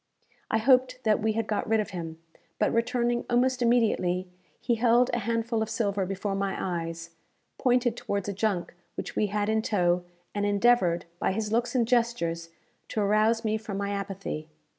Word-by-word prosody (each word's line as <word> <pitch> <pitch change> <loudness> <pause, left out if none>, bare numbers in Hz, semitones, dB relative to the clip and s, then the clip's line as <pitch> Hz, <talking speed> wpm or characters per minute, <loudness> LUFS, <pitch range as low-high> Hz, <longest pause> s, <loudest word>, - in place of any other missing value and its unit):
I - - +2
hoped 255 +2 +3
that 215 -1 +3
we 220 0 +1
had 225 0 -1
got 215 -1 -2
rid 220 0 +3
of 215 0 -2
him, 165 -3 -6 0.4
but 210 - +1
returning 240 +1 +1
almost 250 +1 +2
immediately, 210 -7 +2 0.3
he 240 - 0
held 240 +2 +3
a 240 - +1
handful 230 +1 -1
of 220 - -1
silver 205 -4 0
before 195 +1 -2
my 195 0 -1
eyes, 165 -2 -4 0.5
pointed 245 -2 +2
towards 200 -4 -3
a 200 - -2
junk 200 -3 -1 0.2
which - - -6
we 210 - +2
had 205 0 -1
in 220 0 +2
tow, 180 -5 +1 0.3
and 205 - -1
endeavoured, 205 -4 +3
by - - +1
his 210 +1 -2
looks 235 +2 0
and 235 -3 +2
gestures, 230 -9 0 0.4
to - - -3
arouse 215 +3 +2
me 215 0 +1
from 210 -2 -5
my 200 0 -2
apathy. 195 -6 -4
215 Hz, 180 wpm, -27 LUFS, 195-235 Hz, 0.5 s, hoped